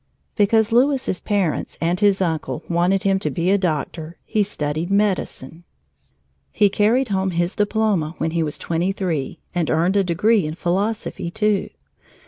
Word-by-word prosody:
Because 220 +1 +3
Louis's 260 -4 +2
parents 200 -7 -1
and 170 +2 0
his 200 -2 +3
uncle 155 -7 -3
wanted 180 +3 +1
him 195 -1 +2
to 205 - -2
be 175 +1 0
a 200 - +4
doctor, 160 -1 -3
he 215 - 0
studied 160 -4 -2
medicine. 190 -6 -1 0.9
He 205 - +3
carried 225 +6 +2
home 190 -1 0
his 175 +1 -1
diploma 205 -6 0
when 160 +1 -1
he 165 0 0
was 150 -2 -2
twenty 170 +3 -1
three 170 -8 -3 0.2
and 175 -3 -1
earned 170 +5 +2
a 200 - +4
degree 190 +2 +2
in 155 - -5
philosophy, 195 +1 -2
too. 210 +1 0
190 Hz, 155 wpm, -21 LUFS, 165-205 Hz, 0.9 s, a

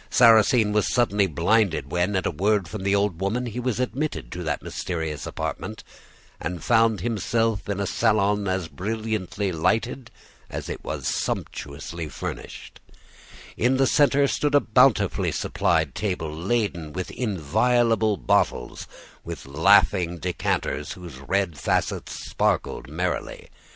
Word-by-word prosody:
Sarrasine 115 -1 +5
was 105 -1 +1
suddenly 105 -5 +2
blinded 85 - +1
when, 90 +3 0
at 95 - 0
a - - +1
word 100 +3 +1
from 105 +3 -6
the 100 +1 +2
old 100 -4 0
woman, 110 +6 -1
he 120 0 -4
was 125 -1 -1
admitted 140 +4 -2
to 90 - -5
that 80 -3 -2
mysterious 80 -5 -4
apartment - - -5 0.6
and 90 +1 -4
found 115 -2 +3
himself 115 -1 0
in 100 -1 -1
a 100 - 0
salon 105 0 +1
as 95 -3 -1
brilliantly 105 +3 -3
lighted 115 +9 0 0.4
as - - -6
it - - -6
was - - -5
sumptuously 75 +3 -4
furnished; 65 - -7 0.8
in 125 +3 +2
the 135 - +4
centre 140 0 +4
stood 145 +1 0
a - - +8
bountifully 125 0 +3
supplied 80 -5 0
table, 85 -7 -3
laden 85 -4 -1
with 95 0 -4
inviolable 110 - +1
bottles, - - 0 0.4
with - - -7
laughing 85 +4 +3
decanters 85 -3 -2
whose 85 -7 -10
red 85 +1 -1
facets - - -2
sparkled 60 - -1
merrily. 90 +4 -3
100 Hz, 135 wpm, -24 LUFS, 85-115 Hz, 0.8 s, a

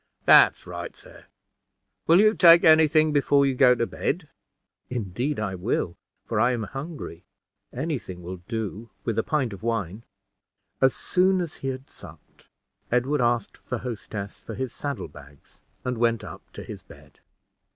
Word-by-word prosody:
"That's - - +6
right, - - -7
sir. - - -16 0.8
Will 170 +3 +6
you 215 +1 +5
take 170 -4 +7
any 160 0 +7
thing 155 0 +3
before 140 -1 +3
you 135 - +1
go 125 -1 +5
to 115 - 0
bed?" 150 +6 -3 0.6
"Indeed 125 +4 -3
I 100 -3 -2
will, 90 -2 -2 0.3
for 115 - -1
I 120 +3 +3
am 115 -2 -2
hungry; 135 - -7 0.5
any 150 +2 -2
thing 90 -4 -10
will 90 +2 -6
do, 110 -1 -4 0.2
with 115 -2 0
a - - +1
pint 135 -8 -1
of 100 - -10
wine." 110 -3 -2 0.8
As 130 -1 +4
soon 185 +1 +2
as 170 -4 -4
he 135 - -5
had 130 0 -5
supped, - - -15 0.4
Edward 125 +4 +1
asked 120 -3 -1
the 120 - -2
hostess 105 -4 -6
for - - -8
his 130 -2 -4
saddle 140 -3 -4
bags, 75 -1 -17 0.2
and 125 -2 -2
went 115 -1 +1
up - - -9
to - - -8
his - - -9
bed. - - -18
125 Hz, 165 wpm, -25 LUFS, 110-145 Hz, 0.8 s, take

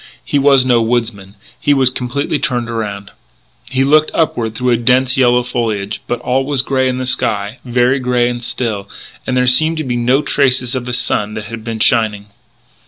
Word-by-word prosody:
He 145 - 0
was 135 -2 +4
no 120 -2 +3
woodsman. 110 -4 -2 0.2
He 145 - +2
was 130 -2 +3
completely 130 +4 -2
turned 120 -4 -2
around. 100 -3 -5 0.6
He 135 0 +1
looked 155 +3 +3
upward 115 -9 -1
through 125 0 0
a - - +4
dense 125 +2 +2
yellow 125 -2 +3
foliage, 110 -4 -3
but 120 - -2
all 130 +2 0
was 135 -2 0
grey 130 -1 0
in 125 - -2
the 130 - -3
sky 105 -3 0
very 125 +2 +1
grey 125 -1 +1
and 120 0 -3
still; 110 -5 -3 0.4
and 125 - 0
there 125 - +2
seemed 155 +6 +4
to 155 - -2
be 125 -3 -2
no 125 +4 +1
traces 130 -4 +1
of 130 -2 -3
the 125 - -4
sun 105 -3 -1
that 110 - -5
had 115 +1 -8
been 115 -1 -5
shining. 105 -2 +1
125 Hz, 195 wpm, -15 LUFS, 115-130 Hz, 0.6 s, was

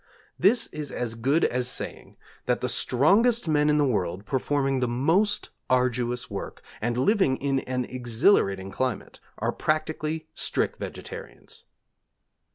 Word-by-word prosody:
This 230 +6 +4
is 150 -1 -6
as 120 -2 -3
good 135 +8 +2
as 125 0 0
saying - - -5 0.3
that 125 - +1
the 125 - 0
strongest 190 - +3
men 150 -1 +3
in 150 - +3
the 145 - +3
world, 100 -5 -1
performing 135 +1 0
the 125 - +1
most 165 - +1 0.2
arduous 125 -1 +1
work, - - -7 0.2
and 120 +2 -1
living 150 - +3
in 135 -1 0
an 125 -1 -2
exhilarating 120 - +2
climate, 130 -1 -3 0.2
are - - 0
practically 155 0 -2
strict - - -1
vegetarians. - - -8
130 Hz, 135 wpm, -26 LUFS, 120-155 Hz, 0.3 s, This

